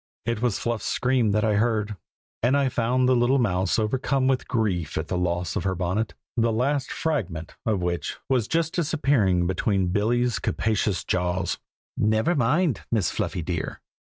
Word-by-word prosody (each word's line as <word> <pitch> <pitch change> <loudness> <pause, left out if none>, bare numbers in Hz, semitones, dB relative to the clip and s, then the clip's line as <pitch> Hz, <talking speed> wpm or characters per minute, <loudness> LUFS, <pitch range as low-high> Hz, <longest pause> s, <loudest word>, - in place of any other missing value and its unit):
It 115 -2 -1
was 120 -5 +1
Fluff's 120 -2 -2
scream 125 -3 +2
that 105 +1 +1
I 105 -2 +2
heard, 105 -2 0 0.5
and 125 +4 +3
I 140 -2 +2
found 125 +1 +1
the 130 - +4
little 120 +3 +3
mouse 95 -6 +1
overcome 130 +4 0
with 130 -1 +1
grief 95 - -1
at 80 - -3
the - - -1
loss 90 0 -1
of - - -1
her 95 -1 0
bonnet, 95 +5 -1 0.2
the 115 -1 +2
last 130 +4 0
fragment 95 - -2
of 100 -5 +1
which 85 -1 -2
was 125 -5 +1
just 165 0 0
disappearing 140 - +2
between 95 +1 +1
Billy's 115 +4 +1
capacious 105 -3 0
jaws. 90 0 -1 0.4
"Never 110 +9 +2
mind, 150 +2 +2
Miss 110 -7 +1
Fluffy, 85 - -2
dear!" 85 -1 -3
110 Hz, 165 wpm, -25 LUFS, 95-130 Hz, 0.5 s, the